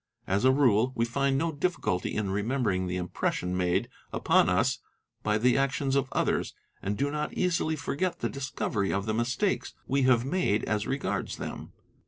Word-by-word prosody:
As 100 +5 +1
Brie 130 -4 +4
we 115 - +1
find 135 +3 +1
no 165 +3 0
difficulty 145 - -1
in 105 -3 -1
remembering 105 -3 0
the 90 +1 -2
impression 90 0 -2
made 90 +5 +1 0.2
upon - - +3
us - - +2 0.4
by 105 0 +1
the 125 +4 +3
actions 135 0 0
of 140 -1 0
others - - 0 0.3
and 100 +1 -2
do 140 +1 0
not 150 0 -3
easily 165 -3 +1
forget 170 +4 -2
the - - -1
discovery 120 -7 -2
of 100 0 -1
the 110 - -1
mistakes 125 - 0
we 140 +1 +1
have 130 -2 +4
made 135 - +1
as 105 -1 -1
regards 140 +1 -2
them. - - -7
125 Hz, 170 wpm, -28 LUFS, 100-140 Hz, 0.4 s, Brie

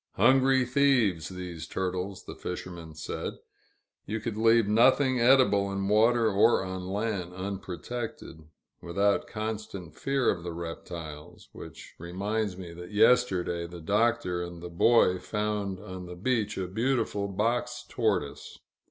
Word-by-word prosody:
Hungry 130 0 +4
thieves, 125 - +2
these 90 -3 -7
turtles, 95 +1 -3
the - - -8
fisherman 85 -3 -7
said; - - -4 0.7
you 110 +2 -2
could 110 0 -4
leave 115 0 +4
nothing 130 +4 +4
edible 120 -6 +4
in 100 0 -2
water 115 +3 +4
or 105 +1 +4
on 95 -1 -5
land, 100 -3 -2
unprotected, 95 +1 -6 0.4
without 100 +4 +1
constant 105 -6 -5
fear 135 -2 +1
of 85 - -4
the 85 0 -5
reptiles 80 -2 -8
which - - -11
reminds 100 +3 -2
me 90 -3 -8
that 90 +1 -9
yesterday 100 -6 +3
the 85 0 -9
Doctor 105 0 +1
and 85 -1 -7
the 90 - -6
Boy 90 +1 +4
found 105 -3 -2
on 95 -3 -8
the 90 - -8
beach 110 +3 -1
a 95 -1 -2
beautiful 110 -1 0
box 120 +5 -1
tortoise. 100 - -2
100 Hz, 135 wpm, -28 LUFS, 90-115 Hz, 0.7 s, Hungry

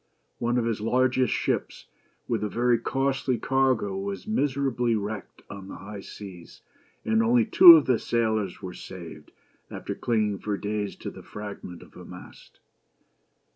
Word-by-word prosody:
One 120 +1 0
of 120 - +1
his 115 -2 -2
largest 130 +1 +2
ships, - - -2 0.4
with 115 -2 -1
a 105 - -1
very 120 +2 +2
costly 135 0 -1
cargo, 130 -5 +1
was 100 0 -5
miserably 135 - 0
wrecked 105 -1 -6
on 100 -1 -9
the - - -8
high 100 +1 -9
seas, 95 -4 -11 0.4
and 225 0 +2
only 235 +1 +3
two 185 -6 +10
of 160 -3 +5
the 125 -3 +2
sailors 110 -5 -1
were 90 -1 -6
saved, 85 -5 -10 0.4
after - - -5
clinging 105 -4 -1
for 105 -2 -3
days 105 0 -3
to - - -7
the - - -12
fragment 100 -4 -9
of - - -19
a - - -11
mast. - - -13
110 Hz, 155 wpm, -26 LUFS, 100-130 Hz, 0.4 s, two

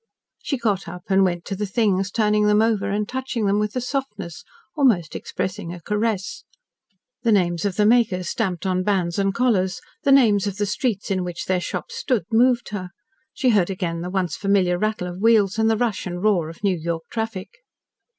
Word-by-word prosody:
She 275 - -2
got 210 -7 -1
up 175 +1 -8
and 195 0 +4
went 175 -2 -1
to 195 - -3
the 205 +2 -3
things, 195 -2 +1
turning 210 0 +2
them 210 0 +4
over, 215 -3 +1
and 205 +1 -1
touching 255 -4 -3
them 200 +1 +2
with 210 +2 -2
a 255 - 0
softness, 240 - -4 0.3
almost 230 - +2
expressing 185 -2 -4
a 175 - -7
caress. 210 +2 -2 0.8
The 235 -2 +2
names 175 -3 +2
of 195 -3 -1
the 210 - +3
makers 210 -6 +3
stamped 190 -4 -2
on 185 -1 +1
bands 185 -2 0
and 195 0 +2
collars, 195 -5 +1 0.2
the 280 - +2
names 215 -7 +5
of 200 -1 -4
the 205 - 0
streets 210 -1 -2
in 185 -1 0
which 175 -1 -5
their 185 -1 0
shops 475 - -5
stood, 255 - 0
moved 240 +1 +3
her. 185 -4 -5 0.4
She 260 - +1
heard 200 -6 +3
again 175 -3 -3
the 180 - -4
once 185 -3 -1
familiar 190 -3 +1
rattle 215 -3 -1
of 180 +2 -7
wheels, 220 -2 +3
and 220 0 +3
the 220 - +2
rush 225 -5 -1
and 175 +1 -5
roar 185 -7 +2
of 165 +5 -13
New 195 -2 +2
York 165 0 -3
traffic. 225 - -5
200 Hz, 200 wpm, -22 LUFS, 185-225 Hz, 0.8 s, names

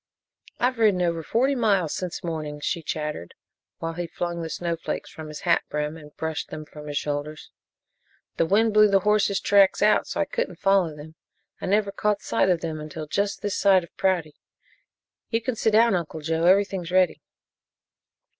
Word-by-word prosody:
"I've 250 0 +1
ridden 205 -5 +3
over 170 -1 0
forty 250 - +1
miles 200 - +1
since 180 0 -4
morning," 155 -3 -4
she 165 +3 -2
chattered, 150 - -5 0.4
while 165 0 -4
he 175 +1 -4
flung 170 +1 -4
the 165 - -4
snow 170 +1 -2
flakes 165 - -5
from 160 -1 -9
his 150 -1 -8
hat - - +3
brim 150 +1 -2
and 150 -2 -14
brushed 160 -1 -3
them 155 0 -7
from 150 0 -11
his 145 -1 -3
shoulders. 150 +1 -4 0.9
"The 165 - +2
wind 220 +4 +3
blew 215 0 +7
the 195 -1 +3
horses' 210 -1 +2
tracks 200 0 +4
out 215 - +4
so - - -4
I - - +2
couldn't - - -3
follow 195 -5 +2
them. 150 +2 -11 0.5
I - - -3
never 200 +1 +2
caught 205 0 -1
sight 190 - +1
of 175 -2 +2
them 160 -2 -4
until 155 +1 -7
just 200 +7 -2
this 205 -1 -1
side 190 -3 +5
of 170 - -15
Prouty. 175 -6 0 1.0
You 225 - +1
can 230 +1 -3
sit 225 - +1
down, 230 +1 +5
Uncle 165 -3 -3
Joe 160 +2 0
everything's 190 -2 +2
ready." 185 -1 +2
175 Hz, 185 wpm, -25 LUFS, 155-200 Hz, 1.0 s, blew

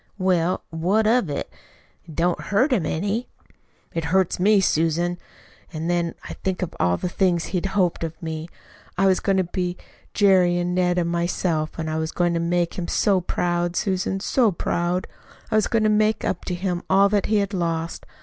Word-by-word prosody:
"Well, 185 -2 +1
what 185 +7 +1
of 225 -5 +3
it? 140 - -4 0.5
It 160 -3 -11
don't 175 +1 +1
hurt 250 +8 +2
him 180 -10 +1
any." 200 +8 -2 0.6
"It 165 -1 -2
hurts 185 +2 +1
me, 205 +2 +5
Susan. 170 0 +1 0.5
And 160 -1 -4
when 170 -1 0
I - - -6
think 190 -1 -1
of 180 - -4
all 90 0 +2
the - - -3
things 175 -2 +1
he 180 -2 -2
hoped 190 -3 0
of 165 0 -5
me. 160 0 -5 0.5
I 195 - +3
was 190 -1 +4
going 195 -1 +1
to 190 - +3
be 180 0 -3 0.4
Jerry 185 -4 +4
and 175 0 -1
Ned 180 0 +1
and 170 -1 0
myself; 170 -2 -1
and 160 -1 -3
I 155 0 -1
was 160 0 -2
going 175 -1 +1
to 170 - 0
make 175 +1 0
him 170 - -3
so 195 -3 +2
proud, 175 0 -1
Susan, 190 0 -1
so 230 +2 +2
proud! 175 +1 -1 0.5
I - - +1
was 215 - +3
going 225 -2 +1
to - - +4
make 215 +1 +2
up 180 - -2
to 180 - -2
him 175 -1 -2
all 195 +1 +5
that 205 -1 +1
he 215 - +1
had 200 0 0
lost. 165 -2 -2
180 Hz, 195 wpm, -23 LUFS, 170-195 Hz, 0.6 s, me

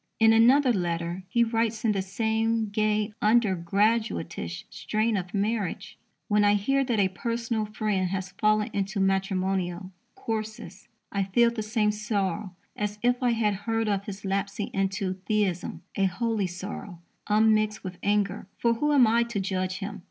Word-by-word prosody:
In 225 0 +6
another 250 +3 +5
letter 170 -1 -2
he 235 +4 +3
writes 225 -1 -1
in 220 - +4
the 195 -2 0
same 220 +2 0
gay, 215 0 0
under 215 -2 +4
graduatish 210 +7 -1
strain 220 +1 -1
of 185 -2 -3
marriage: 210 -1 -2 0.3
When 210 -1 +3
I 205 0 +5
hear 270 +7 +1
that 235 -4 0
a 190 -2 +3
personal 230 +2 -2
friend 210 -3 -1
has 190 0 -3
fallen 215 0 +2
into 200 +1 -2
matrimonial 190 -1 0 0.2
courses, 215 -4 -5 0.2
I 200 -1 0
feel 235 +5 +3
the 235 -2 -4
same 215 0 +1
sorrow 210 -3 -2 0.2
as 210 0 -3
if 245 +1 +2
I 245 -2 +3
had 215 -2 +1 0.2
heard 225 0 +1
of 200 -1 0
his 200 -1 -7
lapsing 200 +1 -2
into 195 0 -1
theism 205 -5 -1
a 195 - +2
holy 210 +1 0
sorrow, 180 0 -7 0.3
unmixed 215 0 +3
with 180 -1 -7
anger; 205 -2 0
for 235 -1 +2
who 295 +6 +1
am 265 -4 +7
I 230 +2 +3
to 235 -3 -3
judge 185 -1 -2
him? 205 +1 -6
210 Hz, 160 wpm, -27 LUFS, 195-225 Hz, 0.3 s, am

